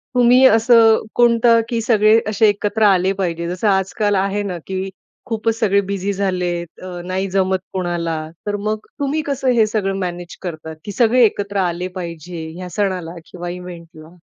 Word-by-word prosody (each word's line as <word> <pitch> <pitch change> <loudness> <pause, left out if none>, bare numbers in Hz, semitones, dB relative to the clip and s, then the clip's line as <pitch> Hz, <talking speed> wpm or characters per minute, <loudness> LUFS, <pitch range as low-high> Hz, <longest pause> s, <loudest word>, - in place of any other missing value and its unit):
तुम्ही 250 +2 +5
असं 225 0 +5 0.2
कोणतं 235 -1 +4
की 230 -2 -1
सगळे 220 -1 +4
असे 215 +1 +3
एकत्र 205 +1 -1
आले 190 -2 +4
पाहिजे? 170 -3 -3
जसं 185 +4 -2
आज-काल 200 +2 +1
आहे 195 +2 0
ना 185 -3 -4
की 190 0 -3 0.4
खूपच 225 -2 -1
सगळे 200 -3 +3
बिझी 200 0 -2
झालेत, 180 -3 -2 0.2
अ, 180 -1 -7
नाही 190 +1 -2
जमत 190 -1 +1
कोणाला 175 -3 -2 0.3
तर 205 - 0
मग 215 0 -3
तुम्ही 285 +2 0
कसं 275 -2 -2
हे 220 - +5
सगळं 195 -3 -1
मॅनेज 175 -1 -5
करता, 160 -3 -6
की 205 - -5
सगळे 240 +3 +3
एकत्र 205 -1 -2
आले 180 -1 -1
पाहिजे, 170 -1 -7
ह्या 180 0 -7
सणाला 185 -4 -2 0.2
किंवा 175 -1 -6
इव्हेंटला? 170 -2 -10
195 Hz, 165 wpm, -19 LUFS, 180-220 Hz, 0.4 s, तुम्ही